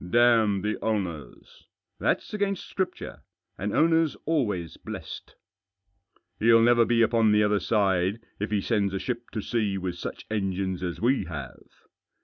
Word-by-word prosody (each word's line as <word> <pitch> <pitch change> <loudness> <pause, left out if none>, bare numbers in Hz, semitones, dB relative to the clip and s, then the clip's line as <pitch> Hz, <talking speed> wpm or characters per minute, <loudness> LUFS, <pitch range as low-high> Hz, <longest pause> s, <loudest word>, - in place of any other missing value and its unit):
" 90 - -9
Damn 110 -5 +4
the 105 0 -1
owners! 95 -9 -4
" - - -31
"Thafs - - 0
against 200 -2 -2
Scripture. 190 -2 -4 0.4
An 100 +2 -2
owner's 165 +1 +3
always 105 - -1
blessed." - - -8 0.5
" 100 0 -43
He'll 115 +1 +6
never 120 0 +5
be 115 0 +3
upon 115 -1 +3
the 105 0 +4
other 105 -1 +2
side 95 0 +1 0.2
if 105 - -2
he 105 -2 0
sends 100 -3 0
a - - -1
ship 120 +1 -4
to 110 - -2
sea 105 -5 -1
with 90 -2 -4
such - - -6
engines 95 -3 -2
as 90 -2 -4
we 130 +4 +1
have." 70 -6 -8
105 Hz, 160 wpm, -26 LUFS, 95-120 Hz, 0.5 s, He'll